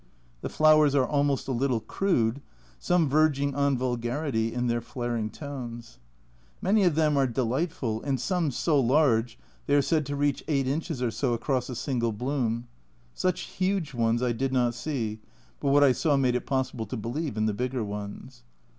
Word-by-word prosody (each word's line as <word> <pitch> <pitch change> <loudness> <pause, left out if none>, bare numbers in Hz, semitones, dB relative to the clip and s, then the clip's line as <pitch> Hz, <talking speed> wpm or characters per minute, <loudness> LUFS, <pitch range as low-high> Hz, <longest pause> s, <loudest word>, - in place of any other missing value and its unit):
The - - -4
flowers 155 -2 +5
are 135 -2 +4
almost 140 -1 0
a - - -1
little 125 -1 +1
crude, 140 - 0 0.4
some 175 -3 +2
verging 140 -1 +2
on 140 -1 +1
vulgarity 120 -1 -1
in 125 +1 -2
their 120 -1 0
flaring 120 -2 -3
tones. 120 -4 -8 0.6
Many 200 +1 +3
of 170 -4 +3
them 155 -2 +2
are 135 -1 +3
delightful, 125 -1 -1
and 135 -2 -1
some 175 +3 0
so 145 +3 +1
large 120 -3 +2 0.3
they 145 - +3
are 145 - +5
said 155 -1 +1
to 145 - -3
reach 145 -1 0
8 140 -3 +1
inches 150 -1 -2
or 120 - 0
so 120 +3 0
across 130 +1 -1
a 125 - -4
single 120 -3 -1
bloom; 120 0 -2 0.5
such 185 -1 -1
huge 185 -6 -2
ones 115 0 +1
I 125 - +2
did 130 +3 -1
not 125 -2 +2
see, 115 -4 -3 0.4
but 140 - 0
what 145 +1 +5
I 140 - +6
saw 145 +3 +1
made 130 -2 +2
it 125 - -2
possible 130 -4 -2
to 125 - -4
believe 120 +3 -3
in 110 - +1
the 110 - +1
bigger 125 +2 -2
ones. 100 -1 -7
130 Hz, 180 wpm, -27 LUFS, 120-145 Hz, 0.6 s, I